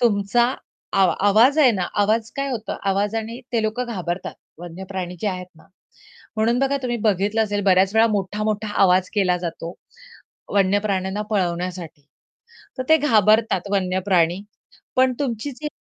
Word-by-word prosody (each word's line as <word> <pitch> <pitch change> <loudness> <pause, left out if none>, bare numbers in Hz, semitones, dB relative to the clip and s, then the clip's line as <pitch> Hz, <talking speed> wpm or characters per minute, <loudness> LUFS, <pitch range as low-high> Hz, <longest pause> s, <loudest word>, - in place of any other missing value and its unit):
तुमचा 235 +2 +2 0.4
आवा 185 -4 +4
आवाज 240 +9 +5
आहे 275 -5 +6
ना 185 -4 -2 0.2
आवाज 220 +2 0
काय 275 0 -2
होता 225 -4 -4
आवाजाने 220 +4 -2
ते 230 -2 +1
लोकं 230 +3 -2
घाबरतात 175 0 -4 0.2
वन्यप्राणी 180 +1 -7
जे 215 - -2
आहेत 180 -1 -5
ना, 160 - -20 0.7
म्हणून 230 +3 +2
बघा 275 +1 +1
तुम्ही 240 -1 -1
बघितलं 210 +2 +1
असेल 205 -1 -1
बऱ्याच 190 +1 +3
वेळा 225 +1 +5
मोठा-मोठा 210 +2 -2
आवाज 185 -1 +4
केला 185 -4 +2
जातो. 170 0 -6 0.8
वन्यप्राण्यांना 195 0 +1
पळवण्यासाठी 175 -6 -3 0.7
तर 255 - -2
ते 315 - +7
घाबरतात 215 - +2
वन्यप्राणी, 185 -2 +1 0.5
पण 255 0 +3
तुमची 265 0 -3
जी 300 - -3
205 Hz, 135 wpm, -22 LUFS, 185-225 Hz, 0.8 s, ते